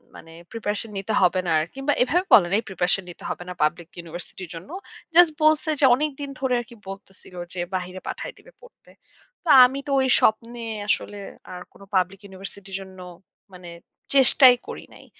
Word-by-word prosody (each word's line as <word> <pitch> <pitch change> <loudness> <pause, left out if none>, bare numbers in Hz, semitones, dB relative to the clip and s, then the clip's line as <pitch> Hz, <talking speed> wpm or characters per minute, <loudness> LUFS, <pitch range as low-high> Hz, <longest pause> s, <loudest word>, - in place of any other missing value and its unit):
মানে 165 - -13 0.2
প্রিপারেশন 220 -1 -3
নিতে 195 +3 -3
হবে 185 0 +3
না - - 0
আরকি। 165 +12 -6
বা - - +5
এভাবে 355 +8 0
বলে 175 -5 +7
নাই 215 - +3
প্রিপারেশন 185 +1 0
নিতে 175 - -12
হবে 175 - -5
না - - -5
পাবলিক 170 +2 -1
ইউনিভার্সিটির 175 +1 -9
জন্য। 165 - -10 0.5
জাস্ট 345 -3 +7
বলছে 310 0 +3
যে - - +6
অনেকদিন 285 0 -4
ধরে 265 -2 0
আরকি 235 0 -14
বলতেছিল 195 -1 -12 0.2
যে 180 - -6 0.2
বাহিরে 185 +1 -5
পাঠায় - - -6
দিবে - - -18
পড়তে। 485 - -20 0.6
তো - - -3 0.2
আমি 270 +2 -2
তো - - -3
ওই 260 - +1
স্বপ্নে 230 +2 0 0.3
আসলে 205 0 -1 0.4
আর 180 - -8
কোন - - -19
পাবলিক 185 +1 0
ইউনিভার্সিটির 195 0 -8
জন্য 190 -1 -13 0.5
মানে, 180 -1 -12 0.5
চেষ্টাই 260 -1 +7
করি - - -7
নাই। - - -16
200 Hz, 175 wpm, -23 LUFS, 180-265 Hz, 0.6 s, বলে